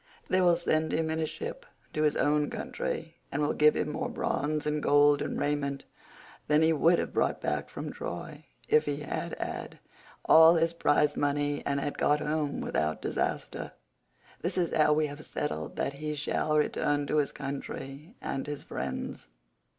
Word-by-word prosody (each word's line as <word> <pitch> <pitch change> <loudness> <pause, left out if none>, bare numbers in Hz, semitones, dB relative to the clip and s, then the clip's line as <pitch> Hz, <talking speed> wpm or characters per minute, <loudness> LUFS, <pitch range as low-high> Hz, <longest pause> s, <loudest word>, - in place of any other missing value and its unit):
They 185 0 +3
will 175 -1 +5
send 160 -2 0
him 160 0 0
in 160 - -1
a 160 - 0
ship 480 - -6 0.3
to 155 - -1
his 150 -1 +3
own 150 0 +2
country, - - -4
and 140 - -2
will 150 0 +1
give 150 0 +5
him - - -1
more 250 +7 -2
bronze 150 - -1
and 150 0 0
gold 145 0 +5
and - - -2
raiment 140 -1 -1 0.6
than 150 +1 +4
he 160 0 +4
would 165 +3 +4
have - - -3
brought - - +1
back - - -2
from - - -6
Troy, - - -6 0.2
if 455 0 +4
he - - -2
had - - -4
had - - -5 0.5
all 160 +1 +8
his 165 0 +2
prize 150 -2 +2
money 145 0 0
and 140 0 +1
had 145 +1 -3
got 150 0 +3
home 150 -1 -1
without 75 +4 -1
disaster. - - -2 0.7
This 175 +2 -2
is 175 -2 +1
how 155 -1 +4
we 155 0 +2
have 145 +1 -7
settled 80 - -4
that 140 - -1
he 150 +2 -4
shall 150 +1 0
return 145 -1 +1
to 150 - 0
his 145 -2 +2
country 140 - -6
and 135 - -3
his 145 -1 -5
friends." - - -5
150 Hz, 180 wpm, -29 LUFS, 145-160 Hz, 0.7 s, all